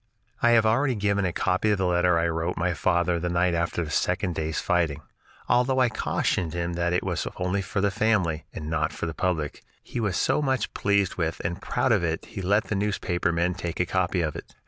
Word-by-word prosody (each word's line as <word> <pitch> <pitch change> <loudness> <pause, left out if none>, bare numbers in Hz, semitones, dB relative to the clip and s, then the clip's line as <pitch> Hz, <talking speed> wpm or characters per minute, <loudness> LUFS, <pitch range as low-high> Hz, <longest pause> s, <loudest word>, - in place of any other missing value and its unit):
I 120 - +5
have 110 - +3
already 125 +4 +2
given 100 -1 +1
a 90 - 0
copy 90 +4 +1
of 105 - +3
the 95 - 0
letter 90 -1 +3
I 85 0 +2
wrote 80 +1 -2
my 90 +1 +1
father 85 +1 +1
the 90 +1 -2
night 85 +1 +2
after 85 +1 -1
the 75 - -6
second 90 - 0
day's 80 0 -2
fighting. 85 -6 0 0.4
Although 125 +2 +2
I 125 -2 +4
cautioned 85 -6 -1
him 85 0 -2
that 85 0 0
it 90 - +1
was - - -2
only 90 +2 0
for 100 +1 -2
the 100 0 +2
family, 95 -8 +1
and 75 - -7
not 80 0 0
for - - -4
the 80 - -3
public, 80 -4 -2 0.2
he - - -5
was 105 -5 0
so 150 - +2
much 130 -5 -1
pleased 100 -2 +1
with 80 -2 -1
and 85 0 -3
proud - - 0
of - - +3
it 80 -1 -1
that - - -15
he 95 - -6
let 100 +4 +2
the 110 - -3
newspaper 95 -4 0
men 85 +2 +1
take 85 -2 -5
a 90 - +3
copy 90 0 0
of 75 -3 -2
it. - - -9
90 Hz, 235 wpm, -26 LUFS, 85-100 Hz, 0.4 s, I